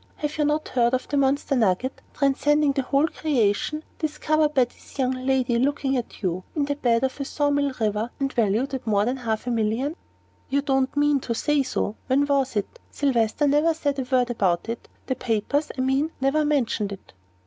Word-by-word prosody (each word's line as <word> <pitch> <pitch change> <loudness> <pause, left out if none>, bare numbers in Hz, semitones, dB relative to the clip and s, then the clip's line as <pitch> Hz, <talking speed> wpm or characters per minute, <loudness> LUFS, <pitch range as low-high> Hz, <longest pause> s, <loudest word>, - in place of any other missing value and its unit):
Have 300 +1 -4
you 300 - +3
not 300 +1 0
heard 240 0 +2
of 255 - -4
the 290 - -1
monster 275 0 +2
nugget, 230 +2 +1
transcending 290 +1 +2
the 275 0 0
whole 275 +2 +1
of 320 - 0
creation, 290 +1 0 0.2
discovered 305 0 0
by 260 - +6
this 245 - -11
young 260 -2 +1
lady 255 -2 +1
looking 275 +1 +1
at 240 -3 -5
you, 180 0 -1
in 295 -2 +1
the 285 - -1
bed 240 -4 +1
of 265 -1 0
the 280 - -3
saw 290 +1 0
mill 285 -1 +1
river, 215 +1 0
and 275 -1 -1
valued 235 +4 +1
at 260 -3 -4
more 205 -1 +3
than 250 +3 -1
half 225 -3 -2
a 245 - -1
million?" 230 +7 0 0.5
"You 280 +1 +1
don't 270 -1 0
mean 290 -1 +3
to 235 -2 -3
say 295 +4 +2
so? 240 -4 -2
When 275 +2 +3
was 275 -3 +1
it? 210 - -3
Sylvester 260 0 +1
never 300 +3 +3
said 285 -3 -1
a 255 - -3
word 250 -2 +3
about 185 -6 0
it 230 0 -5 0.2
the 260 - 0
papers, 255 +5 -1
I - - 0
mean, 265 +4 +1
never 275 +3 +2
mentioned 240 -8 0
it." 195 - -10
265 Hz, 205 wpm, -24 LUFS, 235-290 Hz, 0.5 s, by